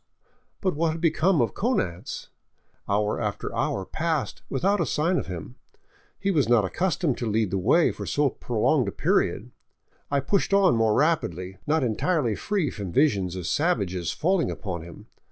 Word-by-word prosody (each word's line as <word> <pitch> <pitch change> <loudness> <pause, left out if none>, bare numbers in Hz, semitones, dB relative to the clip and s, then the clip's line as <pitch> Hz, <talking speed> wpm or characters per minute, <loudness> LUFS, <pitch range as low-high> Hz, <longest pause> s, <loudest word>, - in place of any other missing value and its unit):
But 185 -2 +1
what 160 +1 +1
had 165 - -6
become 165 0 +3
of 115 - -2
Konanz? 135 - -2 0.6
Hour 105 +1 +1
after - - -3
hour 95 - -1
passed 160 - -2
without 195 +9 +1
a - - +2
sign 170 +4 +1
of - - -5
him. 85 -9 -7 0.6
He 195 - 0
was 145 -9 +2
not 115 -4 +4
accustomed 175 - 0
to 120 - -2
lead 110 -2 +1
the 95 - 0
way 165 - +4
for - - -7
so 145 -2 +1
prolonged 115 -2 +1
a - - -1
period. - - 0 0.6
I 140 - +2
pushed 195 +6 +1
on 195 -8 +5
more 110 -1 +2
rapidly, 95 - 0
not 155 -1 +2
entirely 125 +2 +1
free 190 - -1
from 100 -4 -6
visions 100 - +2
of 90 -2 -5
savages 100 - 0
falling 180 +2 +1
upon 95 -5 -4
him. 85 0 -11
135 Hz, 170 wpm, -25 LUFS, -, 0.6 s, on